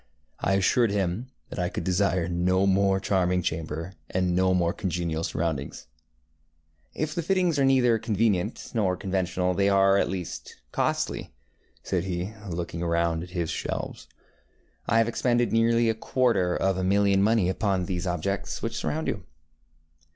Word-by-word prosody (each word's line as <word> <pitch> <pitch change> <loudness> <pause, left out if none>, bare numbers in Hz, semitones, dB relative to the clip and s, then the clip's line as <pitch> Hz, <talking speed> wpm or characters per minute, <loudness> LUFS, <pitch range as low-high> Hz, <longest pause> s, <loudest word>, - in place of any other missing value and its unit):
I 95 - +1
assured 110 +4 +3
him 100 +4 -1 0.2
that - - -5
I 90 0 0
could - - -4
desire 90 -2 +1
no 90 +2 +1
more 95 0 +3
charming 90 -2 +1
chamber, 80 +2 -3 0.2
and 90 -1 0
no 95 0 +3
more 85 -1 +1
congenial 85 -5 -2
surroundings. 75 -5 -3 1.1
ŌĆ£If 155 0 -2
the 170 - -1
fittings 175 -3 +1
are 135 - +4
neither 125 -4 +4
convenient 110 -2 0
nor 95 -6 +1
conventional, 90 -1 -1
they 100 +2 +2
are 100 0 +4
at - - +1
least 90 -3 -6 0.2
costly, - - 0
ŌĆØ - - -12 0.6
said 90 -3 0
he, 90 +2 -3 0.2
looking 85 -1 -4
round 85 -1 +1
at 90 - -8
his 85 -3 -2
shelves. - - -4 0.8
ŌĆ£I 115 - +3
have 115 0 +4
expended 120 0 +1
nearly 115 +1 +3
a 115 - +3
quarter 110 -5 +1
of 95 -1 +1
a - - -1
million 100 +1 +3
of 100 - +4
money 110 -4 +3
upon 95 -1 0
these 90 -1 -3
objects 90 +3 -2
which - - -2
surround 160 +1 -2
you. 100 -5 -2
95 Hz, 160 wpm, -26 LUFS, 90-110 Hz, 1.1 s, are